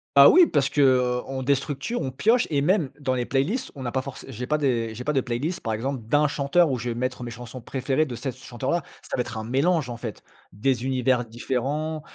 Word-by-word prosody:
Ah 140 0 +10
oui, 355 -1 +7
parce 140 -3 +1
que, 145 - +1
heu, 125 -2 +3
on 135 -1 -4
déstructure, 140 - -1
on 130 - -2
pioche 225 - +2
et 145 -2 +1
même 165 -3 +2
dans 130 -3 0
les 125 -1 -1
playlists, 145 - -1
on 135 - -7
n'a 120 - -2
pas 130 - 0
forcé 135 -1 -9
j'ai 125 +2 -5
pas 150 - +2
des 120 -6 0
j'ai 125 - -6
pas 150 - 0
de 135 - +2
playlist, 130 +8 -2
par 110 - -2
exemple, 125 +3 -2
d'un 150 +3 +3
chanteur 145 +3 +2
où 125 - -1
je 120 +1 -3
vais 115 - -2
mettre 130 0 -3
mes 120 - -5
chansons 120 +2 -9
préférées 135 +5 0
de 120 - -5
cet 130 +1 -4
chanteur-là. 130 +6 -2 0.2
Ça - - -4
va 125 - +1
être 115 -2 -5
un 110 - -3
mélange 140 +5 +1
en 120 - -5
fait. 115 -3 -7 0.3
Des 120 +4 0
univers 130 -2 +1
différents, 135 +7 -2
130 Hz, 240 wpm, -25 LUFS, 125-145 Hz, 0.3 s, Ah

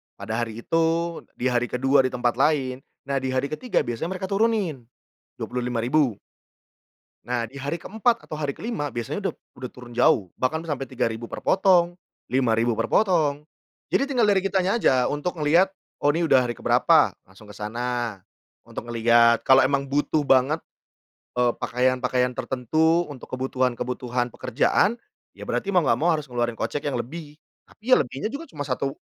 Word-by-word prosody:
Pada 110 +3 -4
hari 115 0 -4
itu, 165 +1 0 0.2
di 125 +1 0
hari 120 0 +1
ke-2 135 +3 +2
di - - +3
tempat 120 -1 -1
lain, 135 -3 +1 0.2
nah 140 0 -2
di 130 - -3
hari 130 +2 0
ke-3 240 +10 0
biasanya 120 +10 -3
mereka 190 +1 -5
turunin. 195 - 0 0.5
Rp25.000. 125 0 0 1.1
Nah, 120 -1 -2
di 135 - -18
hari 145 +5 -4
ke-4 225 +5 0
atau 155 - -5
hari 145 -2 -2
ke-5 145 - -4
biasanya 140 - -4
udop - - -3 0.2
udah 125 -1 -7
turun 125 -1 -12
jauh 105 -5 +3
bahkan 145 +5 0
sampai 140 -3 -2
Rp3.000 120 -3 -3
per - - -5
potong, 180 -2 +3 0.3
Rp5.000 120 -2 +1
per - - -2
potong. 155 -7 +2 0.4
Jadi 275 +1 0
tinggal 240 -4 +3
dari 195 -2 +3
kitanya 195 +1 +1
aja 130 - +3
untuk 160 +4 -3
ngelihat, 170 +6 +3 0.3
"Oh, 145 - +5
ini 165 +2 0
udah 130 -4 +5
hari 120 - -2
ke 120 - -10
berapa." - - +4
Langsung 95 +3 -18
ke 105 - -12
sana 120 0 -3 0.5
untuk - - -7
ngelihat. 115 0 +4
Kalau 130 0 +7
emang 140 +1 +1
butuh 145 +2 +1
banget, 135 +5 +4 0.8
eee, 125 -1 +3
pakaian-pakaian 125 0 +1
tertentu 160 +8 +1
untuk 130 - -11
kebutuhan-kebutuhan 125 -1 -2
pekerjaan 150 - +1 0.4
ya - - -8
berarti 200 - -2
mau 180 -4 +3
nggak 120 -2 +2
mau 175 +3 +3
harus 150 - -6
ngeluarin 120 -1 -1
kocek 145 - -2
yang 135 - -2
lebih. 150 +5 -6 0.3
Tapi 245 +4 -5
ya - - +12
lebihnya 135 - -3
juga 320 +4 -7
cuma 145 -2 -6
satu 135 0 -2
135 Hz, 165 wpm, -24 LUFS, 120-165 Hz, 1.1 s, ya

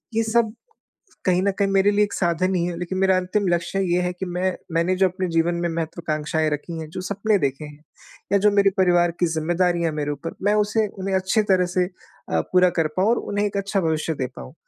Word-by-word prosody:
ये 225 - +2
सब 225 -1 +1 0.7
कहीं 180 0 +3
न 200 - +2
कहीं 200 -1 +2
मेरे 195 +1 +3
लिए 210 +1 +3
एक 205 - -6
साधन 185 +1 0
ही 170 -1 +1
है। 175 -1 -3
लेकिन 180 +1 -4
मेरा 190 -1 +3
अंतिम 185 +2 -1
लक्ष्य 175 +2 0 0.2
ये 180 - +2
है 180 0 -1
कि 185 +1 -6
मैं 180 +1 -1 0.2
मैंने 170 +3 +1
जो 190 0 +4
अपने 185 0 -3
जीवन 165 +1 +1
में 170 - 0
महत्वाकांक्षाएँ 160 -1 -2
रखी 155 +3 -4
हैं, 155 - -7
जो 185 - -5
सपने 200 +3 0
देखे 140 -1 -2
हैं 150 0 -12 0.5
या 200 - +5
जो 210 +2 +4
मेरे 200 -1 +4
परिवार 175 -2 +4
की 175 - +4
जिम्मेदारियाँ 170 0 +1
मेरे 150 -1 -2
ऊपर 145 +3 -6
मैं 205 +1 +3
उसे 210 +1 +1
उन्हें 195 -1 -4
अच्छी 190 +4 +1
तरह 185 -1 +3
से 180 -1 +3 0.5
अ, - - +2
पूरा 180 0 +5
कर 160 - +2
पाऊँ 190 +4 +2
और 240 - +2
उन्हें 205 0 -1
एक 200 - -4
अच्छा 200 0 -1
भविष्य 160 -1 -1
दे 130 -2 -2
पाऊँ। 65 0 -10
180 Hz, 230 wpm, -23 LUFS, 165-195 Hz, 0.7 s, या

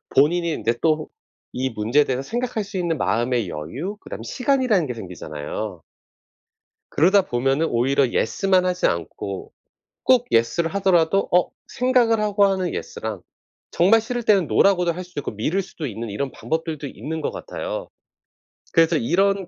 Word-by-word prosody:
본인이 170 +4 +3
인제 115 -5 0
또 155 -1 +1 0.4
이 130 +1 -1
문제에 115 +7 +2
대해서 130 -1 -2
생각할 235 - -2
수 200 0 -6
있는 170 -3 0
마음의 120 -3 0
여유 130 - -5
그다음에 - - -8
시간이라는 250 - +1
게 125 - -4
생기잖아요. 85 -8 -6 1.1
그러다 190 +5 +4
보면은 135 +5 0
오히려 135 +2 +2
예스만 185 - +1
하지 180 0 +1
않고 85 +3 -4 0.5
꼭 250 -2 +4
예스를 165 +11 +1
하더라도 190 -1 +3
어 180 0 +3 0.2
생각을 245 -3 +2
하고 205 -1 +3
하는 190 -2 -1
예스랑 110 -4 -5 0.7
정말 225 0 +7
싫을 240 +2 -3
때는 195 -7 +3
노라고도 180 -3 +3
할 180 +2 -6
수 175 -4 -10
있고 140 - -3
미룰 160 - -1
수도 160 -4 -7
있는 115 0 -5
이런 135 +7 -3
방법들도 160 -2 -3
있는 160 +4 -5
것 - - -1
같아요. - - -5 0.9
그래서 165 -1 +4
이런 195 +7 +1
165 Hz, 340 characters per minute, -22 LUFS, 125-195 Hz, 1.1 s, 정말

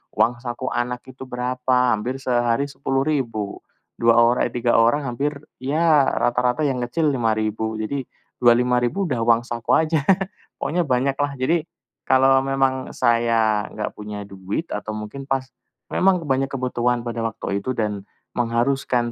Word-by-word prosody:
uang 120 +1 +2
saku 120 +1 -4
anak 125 0 -2
itu 130 0 -11
berapa, 125 +1 -4 0.3
hampir 120 +5 -2
sehari 120 0 +1
Rp10.000, 135 -6 -2 0.4
2 115 0 +5
ora 120 +1 +4
eh, - - -12
3 120 -1 +3
orang 120 +6 +3
hampir 140 +4 -2 0.2
ya 150 +1 +3
rata-rata 125 +4 +1
yang 135 -3 0
kecil 145 +5 0
Rp5.000, 110 -2 -1
jadi 125 +5 -3 0.3
Rp25.000 125 +8 +3
udah 130 -9 -1
uang 115 0 +3
saku 120 -2 0
aja. 160 -1 +2 0.6
Pokoknya 170 0 -1
banyak 135 +2 +1
lah, 145 -1 0
jadi 160 +6 0 0.4
kalau 135 0 +5
memang 135 -1 0
saya 115 -3 +2
nggak 105 - -4
punya 105 -1 -7
duit 100 - -5
atau 105 +1 -4
mungkin 110 +6 -7
pas 135 -1 0 0.5
memang 185 -2 +3
banyak 135 -1 0
kebutuhan 125 -2 -1
pada 120 -1 -4
waktu 110 -3 -2
itu 130 +5 -3
dan 105 -3 -2 0.2
mengharuskan 120 0 0
125 Hz, 145 wpm, -22 LUFS, 115-135 Hz, 0.6 s, 2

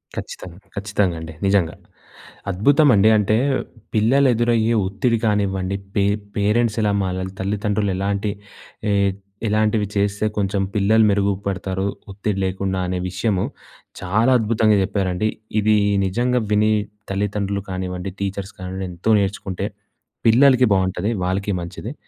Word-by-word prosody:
ఖచ్చితంగా, 90 -1 -7 0.2
ఖచ్చితంగా 100 -3 0
అండి. 80 0 -8
నిజంగా. 95 -4 +2 0.8
అద్భుతం 140 - +4
అండి. 105 +2 +5
అంటే, 105 +1 +2 0.6
పిల్లలు 125 +6 +4
ఎదురయ్యే 115 0 +2
ఒత్తిడి 115 +5 0
కానివ్వండి. 100 -3 0 0.2
పే 100 - +3 0.3
పేరెంట్స్ 105 +2 +1
ఎలా 105 -1 +2
మారాలి, 95 0 -3
తల్లిదండ్రులు 105 +1 -1
ఎలాంటి 100 +1 -1 0.6
ఏహ్, 100 -1 +2 0.3
ఎలాంటివి 105 0 +1
చేస్తే 100 +1 0
కొంచెం 100 -1 0
పిల్లలు 110 +2 +4
మెరుగుపడతారు, 100 -1 -1 0.2
ఒత్తిడి 100 0 -2
లేకుండా 95 0 -2
అనే 90 0 -2
విషయము 95 +1 0 0.6
చాలా 110 +8 +2
అద్భుతంగా 110 -1 +2
చెప్పారండి. 95 +1 -1 0.3
ఇది 105 +1 +3 0.3
నిజంగా 120 +6 +1
విని 105 +1 +3 0.4
తల్లిదండ్రులు 100 0 -2
కానివ్వండి, 90 0 -4
టీచర్స్ 100 0 -4
కానివ్వండి, 95 +1 -5
ఎంతో 90 +6 0
నేర్చుకుంటే 95 -2 -2 0.6
పిల్లలకి 125 +2 +6
బాగుంటది. 95 +2 0
వాళ్ళకి 95 +2 -1
మంచిది. 95 +8 -7
100 Hz, 115 wpm, -21 LUFS, 95-110 Hz, 0.8 s, పిల్లలకి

